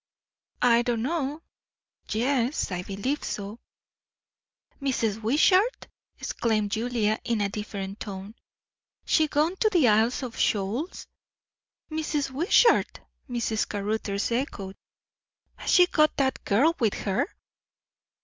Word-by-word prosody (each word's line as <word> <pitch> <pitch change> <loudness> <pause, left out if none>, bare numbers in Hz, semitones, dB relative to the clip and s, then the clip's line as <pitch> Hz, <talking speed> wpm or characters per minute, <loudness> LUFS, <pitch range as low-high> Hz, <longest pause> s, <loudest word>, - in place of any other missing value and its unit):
"I 235 -1 +5
don't 235 -2 -1
know 300 +1 -2 0.7
yes, 250 +2 0
I 180 -1 -2
believe 205 +10 -3
so." 205 +3 -5 1.2
"Mrs. 225 -6 -1
Wishart!" 370 - +3 0.3
exclaimed 215 -3 -1
Julia 220 -1 0
in 235 -3 -1
a 200 -1 0
different 200 -1 -6
tone. 195 0 -7 0.7
"She 315 -1 +3
gone 305 +5 +1
to 435 - +3
the 345 - +4
Isles 225 +5 +3
of 240 -3 -6
Shoals?" 215 - -1 0.9
"'Mrs. 305 -3 -2
Wishart!" 345 - +3 0.3
Mrs. 235 -2 -1
Caruthers 205 0 -2
echoed. 205 -6 -3 0.8
"Has - - -6
she 360 - +7
got 305 -3 +2
that 265 -1 0
girl 280 +12 +3
with 220 -4 +1
her?" 195 - +1
235 Hz, 110 wpm, -26 LUFS, 210-290 Hz, 1.2 s, she